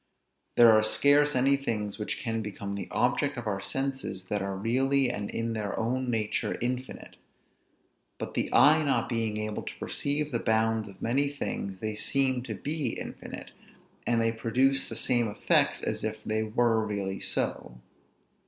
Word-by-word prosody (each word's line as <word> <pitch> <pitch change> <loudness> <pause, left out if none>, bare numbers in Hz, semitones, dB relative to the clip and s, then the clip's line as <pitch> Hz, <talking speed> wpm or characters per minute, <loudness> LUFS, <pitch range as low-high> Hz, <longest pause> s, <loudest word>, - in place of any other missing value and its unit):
There 120 -1 +9
are 110 0 +6
scarce 145 +6 +4
any 135 +2 +4
things 105 -7 -3
which 105 - -2
can 115 -2 -2
become 100 -1 -5
the 100 - -5
objects 140 +3 0
of 120 - -5
our 100 -2 -2
senses, 135 -5 -3
that 105 -1 -1
are 95 0 -3
really 130 +5 +2
and 105 -4 -4
in 115 0 -2
their 105 -2 -3
own 125 +3 -1
nature 110 -3 -1
infinite. 125 +2 -4 1.0
But - - -6
the - - -1
eye 155 +3 +6
not 145 -3 +1
being 115 -3 -1
able 105 0 -3
to - - -7
perceive 145 +1 -1
the 120 - 0
bounds 110 -1 +1
of 95 - -12
many 135 +5 +1
things, 100 -8 -4
they 110 0 -2
seem 130 +3 +1
to 110 -4 -4
be 145 +3 -2
infinite, - - -8 0.6
and 120 -1 +2
they 115 0 +2
produce 130 +4 +1
the - - -6
same 120 -2 +2
effects 105 - +1
as - - -1
if - - -3
they 110 0 -1
were 110 +1 +2
really 100 -2 -3
so. - - -2
115 Hz, 170 wpm, -28 LUFS, 105-135 Hz, 1.0 s, There